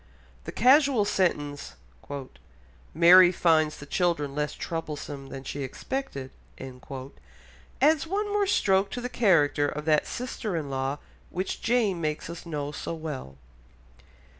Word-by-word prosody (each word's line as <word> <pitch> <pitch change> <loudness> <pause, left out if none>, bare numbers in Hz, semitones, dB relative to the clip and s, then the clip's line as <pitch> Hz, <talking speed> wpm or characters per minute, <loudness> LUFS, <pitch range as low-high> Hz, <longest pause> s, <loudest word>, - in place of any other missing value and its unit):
The - - -5
casual 265 -2 +4
sentence 145 -8 -1 1.2
"Mary 175 +2 +8
finds 160 -3 +2
the 145 - -10
children 160 -3 0
less 150 +1 -2
troublesome 150 -4 -5
than 135 -1 -7
she 140 +1 -5
expected," 135 - -5 0.3
adds 130 - -3
one 410 +3 -2
more 410 -1 +2
stroke 195 - +2
to 245 - -5
the 250 - -4
character 150 - +3
of 150 +1 -5
that 155 -1 +2
sister 235 -5 -4
in 145 -3 -4
law 135 +1 -2 0.3
which 185 +2 -4
Jane 225 -7 +1
makes 155 +1 -3
us 170 0 -9
know 145 -3 -3
so 160 +3 -5
well. 145 - -7
160 Hz, 130 wpm, -27 LUFS, 140-205 Hz, 1.2 s, Mary